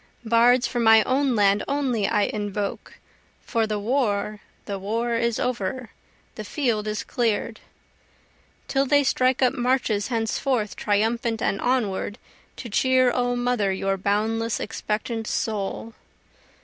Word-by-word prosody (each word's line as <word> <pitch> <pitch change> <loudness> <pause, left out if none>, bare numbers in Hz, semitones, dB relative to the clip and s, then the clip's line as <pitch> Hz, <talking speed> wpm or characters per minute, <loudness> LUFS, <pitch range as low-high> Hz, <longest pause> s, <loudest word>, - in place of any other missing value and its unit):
Bards 235 +2 +4
for 240 +1 -2
my 225 -1 +6
own 260 +1 +1
land 200 -1 +3
only 265 -7 0
I 210 -2 +2
invoke, 205 -1 -4 0.5
(For 225 -2 0
the 215 -1 -2
war 210 -2 -1 0.3
the 200 -2 -4
war 230 +5 -2
is 235 0 0
over, 245 0 -3 0.4
the - - -7
field 230 -8 -1
is 215 0 -2
clear'd,) 230 -4 -1 1.1
Till 275 0 +1
they 285 +1 +4
strike 260 -1 +2
up 250 - +3
marches 245 -4 0
henceforth 230 -1 -1
triumphant 225 +2 0
and 200 - -1
onward, 220 -4 -1 0.4
To 245 - -8
cheer 255 +3 +3
O 245 0 0
Mother 245 -5 0
your 195 +1 -1
boundless 220 +4 -1
expectant 220 +1 -3
soul. 215 +1 -3
225 Hz, 130 wpm, -24 LUFS, 210-250 Hz, 1.1 s, my